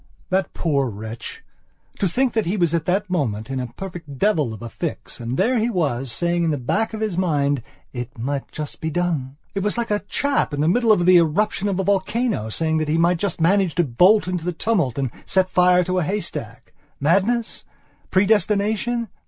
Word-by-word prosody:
That 190 0 0
poor 140 -6 0
wretch! 110 +2 -8 0.6
to 195 - +2
think 250 +7 +1
that 220 -6 0
he 195 +4 0
was 170 -3 +2
at 165 -2 0
that 195 +3 0
moment 130 - -2
in 135 - -2
a 125 - -3
perfect 170 -6 -8
devil 155 - +2
of 110 0 -8
a - - -4
fix, 155 +5 -5
and 120 +2 -3
there 240 +5 +2
he 225 +2 +1
was, 135 - -1
saying 170 +5 0
at - - +1
the 150 - 0
back 220 - -1
of 215 - -6
his 205 -5 -1
mind: 145 -6 +1 0.3
"It 125 0 -6
might 135 +4 -3
just 150 -2 -6
be 160 - -1
done." 155 -6 -1 0.2
It 195 - -2
was 210 +3 -1
like 235 -2 -2
a 205 - +2
chap 275 - 0
in 145 - -1
the 155 - +2
middle 230 +5 +3
of 175 -5 +3
the 180 0 +7
eruption 190 +5 +1
of 195 -2 -1
a - - +1
volcano, 200 - 0
saying 160 +6 0
that 155 -1 -2
he 160 - +2
might 170 +1 +3
just 190 0 -2
manage 185 +1 +2
to 175 - +3
bolt 180 - +4
into 180 -2 -2
the 180 +1 -2
tumult 170 - 0
and 135 -4 -1
set 190 -1 +1
fire 180 0 +4
to 185 +1 0
a - - 0
haystack. 200 +5 -4 0.3
Madness? 200 - +1 0.5
Predestination? 210 +4 +1
175 Hz, 210 wpm, -22 LUFS, 145-205 Hz, 0.6 s, the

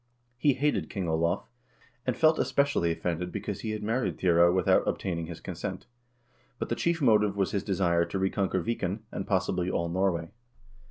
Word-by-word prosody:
lie 145 - +5
hated 145 +3 0
King 95 -4 -3
Olav, 80 +1 0 0.6
and 125 - 0
felt 155 0 +4
especially 140 -12 +2
offended 90 +1 -2
because 105 - -4
he 110 - -4
had 110 -1 -3
married 115 +4 -1
Thyre 85 -1 +5
without 90 0 +3
obtaining 85 -3 -2
his 85 -1 -7
consent; - - -6 0.7
but - - -4
the 120 - 0
chief 165 +3 0
motive 105 -4 +4
was 95 -2 +1
his 100 - 0
desire 85 -3 +2
to 85 +3 -4
reconquer 95 -1 0
Viken, 110 -2 -2
and, 95 - -4
possibly, 95 -2 0
all 85 -2 -1
Norway. 85 -2 0
95 Hz, 170 wpm, -28 LUFS, 85-110 Hz, 0.7 s, lie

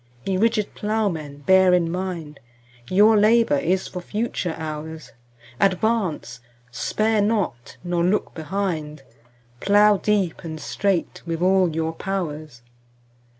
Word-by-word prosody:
Ye 190 - 0
rigid 210 +1 +1
Ploughmen, 170 -10 -2
bear 190 -1 +5
in 170 -2 0
mind 175 -5 -5 0.5
Your 210 +4 +5
labour 230 +6 +4
is 190 -9 0
for 180 - -7
future 205 -3 -3
hours: 155 0 -7 0.5
Advance—spare 180 - -1
not—nor 175 - -2
look 190 +4 0
behind— 160 -3 -3
15 130 -4 -28 0.5
Plough 205 +3 +4
deep 195 -4 0
and 160 -2 -6
straight 190 +2 -1
with 165 +1 -2
all 185 -1 +4
your 160 0 -1
powers! 155 -9 -5
180 Hz, 110 wpm, -23 LUFS, 155-205 Hz, 0.5 s, bear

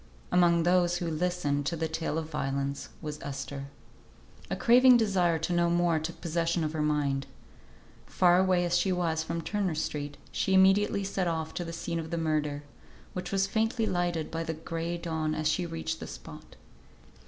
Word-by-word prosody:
Among 170 -2 +4
those 175 0 +3
who 175 - -3
listened 155 -4 -1
to 170 - 0
the 160 0 -1
tale 160 -1 -2
of 160 -1 -3
violence 140 -2 -3
was 150 -1 -5
Esther. 140 0 -5 0.8
A - - -1
craving 250 +1 +6
desire 185 -7 +2
to 160 +3 -2
know 175 0 +3
more 170 -1 +2
took 160 +2 -6
possession 170 0 0
of 155 0 -2
her 155 - -1
mind. 145 -2 0 0.8
Far 180 0 +4
away 185 -1 +3
as 175 0 +1
she 175 +2 +2
was 170 -3 0
from 165 +1 -4
Turner 200 -4 -1
Street, 145 -2 -3
she 190 - +1
immediately 195 +1 +4
set 190 -2 -1
off 160 -1 -2
to 175 - -3
the 165 - -6
scene 170 0 -3
of 160 0 -6
the 170 - -2
murder, 150 -3 -1 0.5
which 180 -1 -5
was 195 0 +2
faintly 225 +3 0
lighted 175 -4 -1
by 165 0 -2
the 160 0 -3
gray 165 +2 -4
dawn 160 -2 -2
as 155 0 0
she 170 +3 0
reached 160 -1 -4
the - - -7
spot. - - -11
165 Hz, 185 wpm, -29 LUFS, 155-180 Hz, 0.8 s, craving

